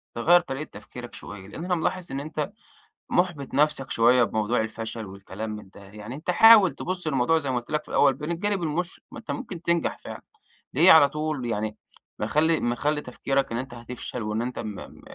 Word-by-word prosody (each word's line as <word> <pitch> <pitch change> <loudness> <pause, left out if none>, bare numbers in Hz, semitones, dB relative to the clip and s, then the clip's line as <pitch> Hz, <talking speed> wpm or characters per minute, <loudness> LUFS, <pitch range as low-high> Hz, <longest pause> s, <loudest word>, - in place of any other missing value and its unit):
تغيَّر 170 +9 +5
طريقة 150 -2 -6
تفكيرك 120 +4 -10
شوية، 100 -2 -9
لأن 160 - -7
أنا 180 0 +1
ملاحظ 180 0 -2
إن 135 - -3
أنت 150 0 -4 0.6
محبط 175 -7 0
نفسك 140 -2 +1
شوية 120 +2 +5
بموضوع 110 +1 0
الفشل 110 0 -5
والكلام 100 +2 -7
من 105 -2 -8
ده، 100 - -15
يعني 105 +4 -9
أنت 155 +5 -2
حاول 215 -1 +8
تبص 180 -2 -4
للموضوع 140 +2 +2
زي 140 -4 -2
ما 125 - 0
قلت 120 - -14
لك 150 -1 0
في - - -17
الأول 140 -2 +3
من 150 +3 -3
الجانب 195 +2 -1
المشرق، 170 +3 -3
ما - - -8
أنت 225 - -6
ممكن 175 -3 -6
تنجح 170 -1 0
فعلًا، - - -9 0.5
ليه 165 +7 +7
على 145 -3 +8
طول 150 -3 -3
يعني 110 -2 -2 0.4
مخلّي 160 +2 +2
مخلّي 145 +5 0
تفكيرك 135 +1 -1
إن 115 - -1
أنت 130 0 -5
هتفشل 120 +1 -7
وإن 105 +1 -2
أنت 125 +1 -4
م 105 -3 -5
م - - -12
135 Hz, 200 wpm, -25 LUFS, 115-160 Hz, 0.6 s, حاول